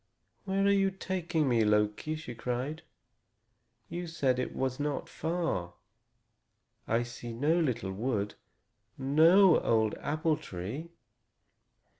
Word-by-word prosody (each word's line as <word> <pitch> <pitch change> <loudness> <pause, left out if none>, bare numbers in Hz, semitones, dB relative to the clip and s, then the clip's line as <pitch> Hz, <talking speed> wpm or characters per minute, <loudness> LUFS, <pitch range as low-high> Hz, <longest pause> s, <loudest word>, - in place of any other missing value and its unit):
"Where 195 0 +1
are 200 - +5
you 195 -1 +3
taking 175 -5 -1
me, 120 -3 +3
Loki?" 105 +7 +1
she 155 -6 -7
cried. 125 +7 -3 1.1
"You 175 +6 -5
said 135 -6 0
it 125 - -3
was 130 0 -1
not 145 0 -2
far. 160 - -2 1.1
I 115 +2 +2
see 120 0 -8
no 150 +8 +2
little 120 - -1
wood, 105 0 -2 0.6
no 160 +7 +6
old 110 -2 +2
apple 155 +1 0
tree." 105 - -6
140 Hz, 115 wpm, -30 LUFS, 115-165 Hz, 1.1 s, no